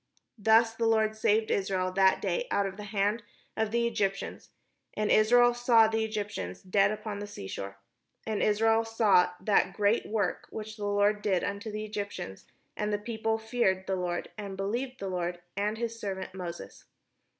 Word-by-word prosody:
Thus 225 +2 +5
the 230 0 0
Lord 220 -1 +2
saved 220 0 +2
Israel 190 -2 0
that 190 0 +3
day - - -1
out 200 - +1
of 195 -1 -4
the 210 +1 -8
hand 205 +2 0 0.3
of 220 -1 0
the 235 +1 +1
Egyptians; 205 -4 -2 0.5
and 215 0 0
Israel 240 +3 +5
saw 240 -2 +5
the 220 0 0
Egyptians 210 - -4
dead 195 +2 +3
upon 215 -1 -4
the 205 - -5
sea 150 - -8
shore. 100 0 -6 0.5
And 215 -2 -2
Israel 225 +2 +3
saw 225 -5 +3
that 190 -1 +2
great 205 +3 +1
work 215 -1 -1
which 215 0 -7
the 210 -2 -5
Lord 205 +1 +2
did 190 -4 +1
upon 200 0 -2
the 215 -1 -4
Egyptians; 200 - -6 0.3
and 210 0 -2
the 205 - +1
people 220 +1 -2
feared 220 -4 0
the 190 - -1
Lord, 180 -1 -3
and 200 -2 -6
believed 240 +7 -3
the 195 - -4
Lord, 175 -1 -2 0.2
and 210 +2 -1
his 230 0 -4
servant 190 -3 -5
Moses. 175 -2 -8
210 Hz, 175 wpm, -29 LUFS, 195-220 Hz, 0.5 s, Thus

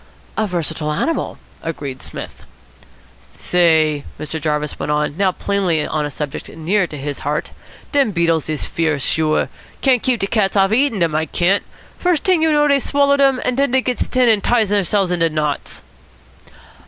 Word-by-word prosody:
"A 220 - 0
versatile 160 -4 -2
animal," 320 - -2 0.2
agreed 145 -5 -5
Psmith. - - -8 1.0
"Say," 160 -4 +2 0.2
Mr. 155 +1 -5
Jarvis 150 0 -2
went - - -2
on, 150 -1 0
now 190 +1 +2
plainly 180 -5 0
on 150 -1 -1
a - - -6
subject 145 0 -6
near 175 +4 0
to 150 - -8
his 145 0 -5
heart, 150 +2 -2 0.4
"dem 280 -5 +3
beetles 165 -5 +1
is 155 -2 -1
fierce. 155 -5 -1
Sure. 155 -1 +1 0.3
Can't 255 -4 +3
keep 250 -3 +1
de - - 0
cats 200 -1 0
off 195 0 +4
of - - -1
eatin' 255 -1 +2
dem, 170 -4 +1
I 155 +1 0
can't. 185 +6 +2 0.4
First 355 -4 +1
t'ing 365 -4 +3
you 320 0 +3
know 295 -1 +3
dey've 280 -1 +3
swallowed 280 +1 +2
dem, 270 -2 +3
and 250 - +1
den 280 +1 +2
dey 260 +1 +2
gits 250 -1 -1
thin 255 -1 +2
and 220 -3 +3
ties 230 -4 +2
theirselves 200 -2 +1
into 165 -2 +2
knots." 150 -2 -3
180 Hz, 180 wpm, -19 LUFS, 155-245 Hz, 1.0 s, off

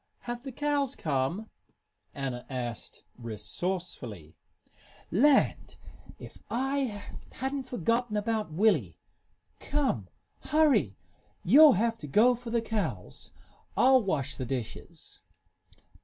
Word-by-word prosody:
"Have 240 0 -5
the 270 +1 -7
cows 285 0 0
come?" 155 +9 -2 0.6
Anna 130 -3 -4
asked, 120 -4 -5 0.2
resourcefully. 115 - -5 0.8
"Land! 270 - +3 0.4
If - - -12
I 260 -4 -1 0.3
hadn't 265 0 -3
forgotten 230 +1 0
about 215 -3 -1
Willie! 155 - +2 0.6
Come 290 -1 -1 0.3
hurry! 280 - +2 0.5
You'll 290 - +8
have 225 +3 0
to 150 - -7
go 220 - +5
for 240 0 -8
the 230 0 +1
cows. 175 - -4 0.5
I'll 260 0 +6
wash 145 - -2
the 130 - -3
dishes." 125 -3 -6
210 Hz, 100 wpm, -29 LUFS, -, 0.8 s, You'll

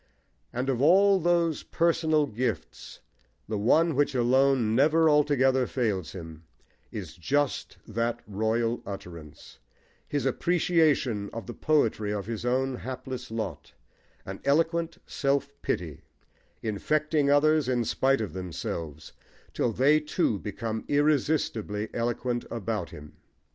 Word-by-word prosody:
And 125 +2 -3
of 130 -2 0
all 195 +6 +5
those 170 -2 +1
personal 160 -2 +1
gifts 120 -3 -4 0.5
the 105 0 -2
one 160 +10 +3
which 145 0 +1
alone 125 -2 +3
never 155 +6 +4
altogether 135 -4 +3
fails 105 -9 -2
him 80 -3 -9 0.5
is - - -7
just 145 - -1
that 115 +2 -1
royal 110 +3 -1
utterance, 85 -6 -10 0.5
his 145 -2 -2
appreciation 150 - +1
of 115 - -6
the 120 - -7
poetry 115 -9 +1
of 100 -2 -3
his 115 +1 -4
own 130 +1 0
hapless 130 0 -6
lot, 110 -9 -5 0.5
an - - -7
eloquent 165 +3 +1
self 140 0 -1
pity, - - -3 0.6
infecting 150 +7 0
others 150 -1 +3
in 120 -2 +1
spite 135 +3 +2
of 105 - -4
themselves, 85 -4 -6 0.4
till 120 - 0
they 140 +7 +4
too 150 - 0
become 110 +2 -4
irresistibly 145 -8 0
eloquent 120 +1 -1
about 110 -5 -3
him. 75 0 -12
125 Hz, 120 wpm, -27 LUFS, 110-150 Hz, 0.6 s, all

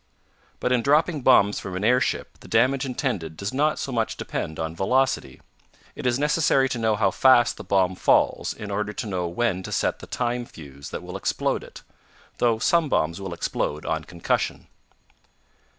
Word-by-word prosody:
But 125 - -1
in 125 -2 +3
dropping 150 +3 +2
bombs 100 -4 +4
from 95 -1 -6
an 95 - -3
airship 125 +3 +1
the - - -14
damage 130 +4 +2
intended 110 - -3
does 100 +4 -4
not 150 +3 +1
so 135 - -4
much 115 -3 -1
depend 80 - -4
on 80 0 -4
velocity. 125 - 0 0.5
It - - -3
is 120 -1 +2
necessary 150 -2 +2
to 125 - -3
know 110 -1 +2
how 100 -2 +2
fast 125 0 +4
the - - -9
bomb 95 -2 +2
falls - - +2
in 105 -1 -7
order 105 +1 -2
to - - -4
know 90 -4 -2
when 95 +1 -1
to - - -8
set - - 0
the - - -11
time 120 0 -2
fuse 70 - -11
that - - -6
will - - -6
explode - - -1
it; - - -13 0.6
though 115 -2 +3
some 165 +5 +2
bombs 85 -2 0
will 95 -2 -5
explode 75 -2 -3
on 80 0 -1
concussion. 85 +1 -2
110 Hz, 180 wpm, -24 LUFS, 90-130 Hz, 0.6 s, bombs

